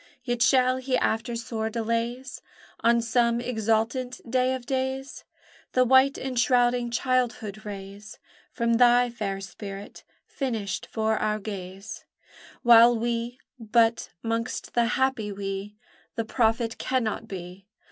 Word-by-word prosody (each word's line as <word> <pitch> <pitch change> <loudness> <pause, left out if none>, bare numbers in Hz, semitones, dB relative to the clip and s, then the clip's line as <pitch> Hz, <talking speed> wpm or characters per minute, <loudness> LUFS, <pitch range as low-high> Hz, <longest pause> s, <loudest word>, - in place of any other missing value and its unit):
Yet 240 -2 -2
shall 255 +2 +4
he 260 0 0
after 225 +2 -1
sore 230 -2 -3
delays 230 +3 -3 0.4
On 235 0 +3
some 235 0 +2
exultant 240 +2 -1
day 255 +2 +1
of 255 -2 -8
days 265 0 -3 0.5
The 255 0 +4
white 265 +2 +5
enshrouding 245 -1 +2
childhood 240 -4 -1
raise 200 +1 -9 0.3
From 235 0 0
thy 245 0 +5
fair 200 -4 -3
spirit, 200 +1 -9 0.2
finished 220 -9 -3
for 220 -1 0
our 215 0 0
gaze; 195 -1 -7 0.6
While 235 0 +7
we 235 +1 -2 0.2
(but 225 0 +2
'mongst 230 +1 -3
that 235 0 +2
happy 260 -6 0
"we" 195 +1 -5 0.4
The 230 - -2
prophet 225 0 0
cannot 230 -3 -1
be!) 185 0 -8
235 Hz, 120 wpm, -26 LUFS, 215-250 Hz, 0.6 s, While